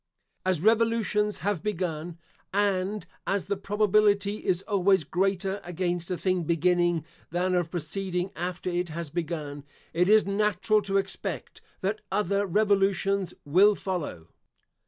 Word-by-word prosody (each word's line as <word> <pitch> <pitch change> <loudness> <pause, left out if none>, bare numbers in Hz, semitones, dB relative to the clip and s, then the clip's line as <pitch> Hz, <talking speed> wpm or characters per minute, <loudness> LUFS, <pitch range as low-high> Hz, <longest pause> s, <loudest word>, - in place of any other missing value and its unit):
As 185 -4 +1
revolutions 220 -1 +2
have 205 -5 0
begun 175 -4 -3 0.3
(and 200 0 0 0.2
as 195 -1 0
the 200 - -1
probability 205 0 +2
is 185 0 0
always 195 -3 +3
greater 190 +4 0
against 175 0 -2
a 180 - -1
thing 185 -1 0
beginning, 175 0 +2 0.2
than 180 +2 0
of 175 -2 +1
proceeding 180 +2 -3
after 180 +1 -3
it 175 0 -1
has 160 -1 -5
begun), 155 -4 -4 0.3
it 180 +3 +2
is 215 0 +6
natural 210 +1 +2
to 195 -1 0
expect 195 0 -4 0.2
that 200 +3 -1
other 200 0 +1
revolutions 195 -1 +2
will 195 +8 +5
follow. 160 - -4
190 Hz, 130 wpm, -27 LUFS, 175-200 Hz, 0.3 s, is